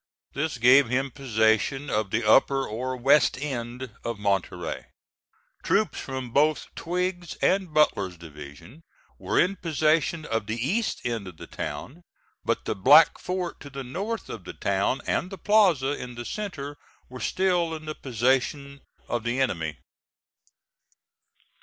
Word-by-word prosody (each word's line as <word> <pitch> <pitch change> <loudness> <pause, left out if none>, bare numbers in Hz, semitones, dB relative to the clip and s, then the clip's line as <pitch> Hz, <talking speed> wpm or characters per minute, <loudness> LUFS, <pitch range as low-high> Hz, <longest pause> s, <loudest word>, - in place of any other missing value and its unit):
This 150 -1 -2
gave 125 +1 +6
him 135 +2 0
possession 120 +2 +1
of 105 -1 0
the 115 +4 0
upper 135 +4 +4
or 130 +4 -3
west 135 +2 +4
end 125 -3 -4
of 115 -1 -3
Monterey. 100 -3 -2 0.8
Troops 215 +2 +1
from 130 -2 -5
both 150 +4 +2
Twiggs's 175 0 -3
and 190 -3 +1
Butler's 100 - +2
divisions 80 - -12 0.4
were - - 0
in 195 +2 +2
possession 155 0 +1
of 115 -6 -2
the 110 - -2
east 190 - -1
end 115 -5 -2
of 90 -3 -10
the - - -9
town, 155 +7 -6 0.4
but - - -1
the - - 0
Black 145 +11 +6
Fort 180 -1 -3
to 140 - -10
the 135 0 -6
north 200 - -4
of 110 - -7
the - - -8
town 100 +6 0
and 180 - -1
the 195 - -8
plaza 180 -9 +3
in 125 -4 -6
the 120 0 -6
centre 150 - -5 0.3
were 125 0 -9
still 175 +3 +1
in 155 0 -9
the 155 - -4
possession 135 +2 -1 0.3
of 120 -2 -2
the 120 +3 -1
enemy. 85 - -1
135 Hz, 145 wpm, -26 LUFS, 115-160 Hz, 0.8 s, gave